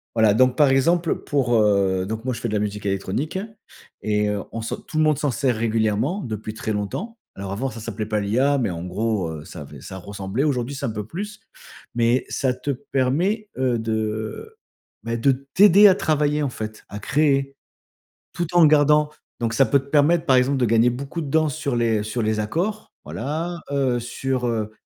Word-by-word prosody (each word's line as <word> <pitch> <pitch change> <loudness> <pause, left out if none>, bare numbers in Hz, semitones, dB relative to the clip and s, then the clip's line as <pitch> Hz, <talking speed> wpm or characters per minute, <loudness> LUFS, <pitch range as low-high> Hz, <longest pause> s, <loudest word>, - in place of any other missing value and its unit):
voilà, 110 -2 +5
donc, 130 +1 +3
par 150 -2 +5
exemple, 165 +6 +2
pour, 130 -5 +1
heu, 100 -3 +2
donc 110 +3 -5
moi 130 - 0
je - - -7
fais 120 - -2
de - - -4
la 105 - +1
musique 105 0 -3
électronique 100 - -2 0.6
et 105 -1 +1
heu, 100 -2 -2
on 115 - -4
s'en 115 - -3
tout 155 - -8
le 155 - +4
monde 155 -3 +3
s'en 145 -3 0
sert 130 -2 0
régulièrement 115 - 0
depuis 110 -2 -5
très 110 0 -3
longtemps. 145 - -4 0.2
Alors 100 -1 -6
avant, 130 +7 -2
ça 115 - -8
s'appelait 110 -1 -4
pas 105 -1 0
l'IA, 130 +8 +2
mais 120 - 0
en 85 -1 -5
gros, 100 -1 -1
heu, 75 -1 -8
ça 85 - -9
avait 70 - -11
ça 95 - -8
ressemblait, 100 +6 -3
aujourd'hui, 135 -2 -1
c'est - - -4
un - - -2
peu 105 -1 -5
plus 210 - -6 0.6
mais 120 +2 +2
ça 130 -2 0
te 125 +3 -6
permet, 145 - -1
heu, 125 -3 +1
de, 110 0 -2
heu, 110 0 -4 0.5
bah 115 +1 -2
de 135 +4 +3 0.2
t'aider 205 +1 +8
à 190 - +6
travailler 150 -3 +1
en 140 - 0
fait, 110 -2 -7
à 105 - -6
créer. 140 +2 +1 0.8
Tout 175 +1 -1
en 170 -2 +7
gardant 150 0 +4 0.3
donc 115 -1 -1
ça 135 - +4
peut 140 - +3
te 140 - -16
permettre, 160 +3 +3
par 135 - +4
exemple, 135 +2 +2
de 125 - +2
gagner 115 +2 +4
beaucoup 135 +7 -5
de 145 - -5
danse 155 -2 +2
sur 140 -5 -2
les 115 -3 +1
sur 115 +2 -2
les 110 0 0
accords. 180 - -2
Voilà, 165 +4 -4
heu, 130 -3 +1
sur, 125 +1 -2
heu 110 -2 -2
125 Hz, 210 wpm, -23 LUFS, 110-145 Hz, 0.8 s, t'aider